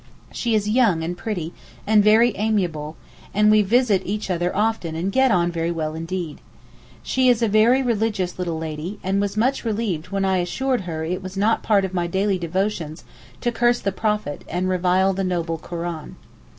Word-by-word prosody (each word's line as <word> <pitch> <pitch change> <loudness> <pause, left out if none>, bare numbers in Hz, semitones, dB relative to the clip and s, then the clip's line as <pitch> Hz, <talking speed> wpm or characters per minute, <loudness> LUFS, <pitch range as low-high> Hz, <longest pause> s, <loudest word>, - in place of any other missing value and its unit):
She 235 -2 -1
is 210 -1 0
young 210 -7 +3
and 175 +2 -3
pretty, 175 -5 -4 0.3
and 210 0 +4
very 220 +2 +5
amiable, 180 -8 -1 0.4
and 210 +1 +5
we 215 0 +6
visit 215 -1 +3
each 205 0 -3
other 175 0 0
often 210 -6 0
and 175 +4 -2
get 265 +4 +3
on 175 -4 +2
very 165 0 -2
well 160 -2 -2
indeed. 165 0 -5 0.6
She 260 -1 +2
is 240 -1 +3
a - - +3
very 225 +5 +4
religious 215 -6 -1
little 170 -3 -2
lady, 160 +5 -5
and 195 +2 +1
was 205 +1 -2
much 255 +5 +1
relieved 210 -7 -2
when 195 0 -1
I 190 -1 +2
assured 250 +8 -1
her 160 -1 -3
it 180 +3 -3
was 190 0 -8
not 215 +3 +2
part 200 -3 +2
of 190 - -6
my 175 -2 0
daily 190 +2 0
devotions 175 -2 -2 0.4
to 240 - 0
curse 240 +1 +2
the 195 - -1
Prophet, 210 -6 -2
and 180 +1 -2
revile 185 +1 +2
the 195 +1 -2
noble 170 -3 -2
Koran. 170 -2 -6
190 Hz, 190 wpm, -22 LUFS, 170-215 Hz, 0.6 s, we